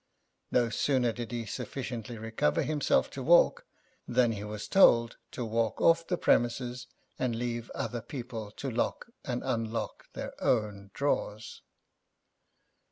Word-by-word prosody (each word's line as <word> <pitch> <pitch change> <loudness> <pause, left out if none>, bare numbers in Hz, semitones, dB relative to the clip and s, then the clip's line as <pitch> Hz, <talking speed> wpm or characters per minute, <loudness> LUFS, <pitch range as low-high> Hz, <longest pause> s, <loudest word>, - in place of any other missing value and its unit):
No 120 -2 +2
sooner 130 -3 +2
did 120 -1 -6
he 120 -1 -3
sufficiently 120 +1 -5
recover 110 -8 0
himself 150 -2 +1
to - - -6
walk, - - +4 0.4
than 120 -2 +3
he 105 -2 -4
was 105 0 -6
told 115 -11 +5 0.2
to 125 - -3
walk 115 0 0
off 165 0 +4
the 180 - 0
premises, 125 -1 +1 0.3
and 125 -3 0
leave 120 0 -3
other 120 -1 -3
people 120 -5 -6
to 135 - -4
lock 120 - -2
and 125 -3 -3
unlock 115 0 -3
their - - -5
own 105 -4 0
drawers. 110 -6 -2
120 Hz, 135 wpm, -30 LUFS, 115-130 Hz, 0.4 s, told